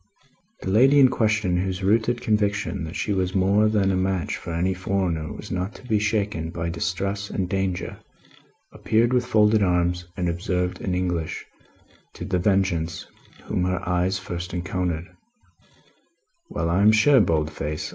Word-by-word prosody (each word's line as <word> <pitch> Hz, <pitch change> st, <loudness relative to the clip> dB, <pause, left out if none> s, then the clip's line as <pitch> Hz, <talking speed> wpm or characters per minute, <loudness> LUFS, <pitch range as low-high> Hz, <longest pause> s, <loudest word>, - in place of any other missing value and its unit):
The -, -, -4 dB
lady 135 Hz, +7 st, +5 dB
in 130 Hz, -2 st, +7 dB
question, 105 Hz, -6 st, +1 dB
whose 95 Hz, +1 st, -2 dB
rooted 115 Hz, +4 st, +2 dB
conviction 100 Hz, -5 st, 0 dB
that 80 Hz, -, -8 dB
she 105 Hz, -, -1 dB
was 95 Hz, -1 st, -1 dB
more 100 Hz, +3 st, +3 dB
than 100 Hz, -3 st, +2 dB
a -, -, +1 dB
match 95 Hz, -3 st, -1 dB
for -, -, -7 dB
any 90 Hz, +3 st, 0 dB
foreigner, 90 Hz, -4 st, -2 dB
was -, -, -9 dB
not 95 Hz, +3 st, -3 dB
to 125 Hz, -, -13 dB
be 110 Hz, -2 st, +2 dB
shaken 105 Hz, -6 st, -1 dB
by 85 Hz, 0 st, -3 dB
distress 100 Hz, +4 st, -3 dB
and, 95 Hz, -2 st, -2 dB
danger, 95 Hz, -2 st, -2 dB, 0.7 s
appeared 115 Hz, +2 st, +1 dB
with 125 Hz, 0 st, +1 dB
folded 105 Hz, -1 st, +4 dB
arms, 90 Hz, -1 st, +1 dB
and 90 Hz, -2 st, -1 dB
observed 90 Hz, +1 st, -2 dB
in 90 Hz, -2 st, -1 dB
English 90 Hz, -3 st, -2 dB, 0.7 s
to -, -, -6 dB
The 90 Hz, -1 st, 0 dB
Vengeance, 90 Hz, -4 st, 0 dB, 0.4 s
whom 90 Hz, -, -2 dB
her 90 Hz, -1 st, -2 dB
eyes 90 Hz, +1 st, +1 dB
first 90 Hz, -1 st, -6 dB
encountered, 90 Hz, -2 st, -2 dB, 1.4 s
"Well, -, -, -2 dB
I 90 Hz, +3 st, +2 dB
am 105 Hz, +1 st, +7 dB
sure, 130 Hz, +6 st, +5 dB
Boldface! 75 Hz, -3 st, -1 dB
95 Hz, 155 wpm, -24 LUFS, 90-105 Hz, 1.4 s, in